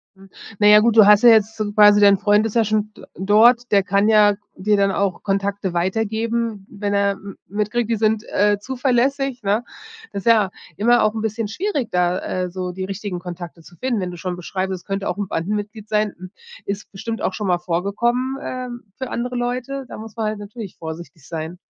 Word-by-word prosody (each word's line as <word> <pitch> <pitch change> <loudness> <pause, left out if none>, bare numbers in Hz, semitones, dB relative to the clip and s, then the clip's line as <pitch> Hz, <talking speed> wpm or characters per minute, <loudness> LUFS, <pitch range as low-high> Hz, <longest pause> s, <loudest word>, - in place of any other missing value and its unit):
Hm, 195 0 -17 0.3
na 205 - +5
ja, 210 0 +9
gut, 225 +1 +2
du 215 - +9
hast 210 +3 +6
ja 240 - +9
jetzt 220 -1 +4
so 210 -1 -2
quasi 210 0 +7
dein 200 -1 +6
Freund 210 +2 +3
ist 225 - -4
ja 230 - +4
schon 215 0 -1
d - - -14
dort, 225 +6 +4
der 200 -2 +4
kann 200 +2 +2
ja 210 -1 +5 0.2
dir 210 +3 +1
dann 200 -1 +2
auch 195 -2 -1
Kontakte 195 -1 -2
weitergeben, 220 +3 -1
wenn 205 0 -3
er 200 0 +2
m 195 0 -9
mitkriegt, 210 +3 -2
die 230 - +2
sind, 215 0 +1
äh, 205 0 +2
zuverlässig, 260 +1 0
ne? 205 +4 +1 0.5
Das 200 - -6
ja 220 -4 +4 0.3
immer 240 +6 +3
auch 215 - +2
'n 220 - -4
bisschen 220 0 -2
schwierig, 285 - -2
da, 180 0 +1
äh, 180 -1 -3
so 180 0 -4
die 185 +1 -5
richtigen 195 -2 -5
Kontakte 175 -1 -8
zu 175 - -17
finden. 245 +1 -1
Wenn 180 -1 -3
du 175 - -9
schon 180 +1 -4
beschreibst, 190 +2 -3
es 180 - -8
könnte 195 0 -3
auch 180 - -2
'n 205 -1 -3
Bandenmitglied 205 +5 -4
sein. 210 -1 0
Hm, 185 +1 -10 0.3
ist 200 +1 -5
bestimmt 225 +3 -5
auch 190 - -1
schon 210 -1 -4
mal 175 -1 +2
vorgekommen, 235 +10 -1
ähm, 250 -3 -6
für 260 -1 -5
andere 245 +1 -3
Leute. 250 +3 -3
Da - - -9
muss 220 0 -10
man 225 -2 -2
halt 215 0 -2
natürlich 205 -1 -9
vorsichtig 160 -1 -9
sein. 165 +1 -6
205 Hz, 215 wpm, -21 LUFS, 190-225 Hz, 0.5 s, ja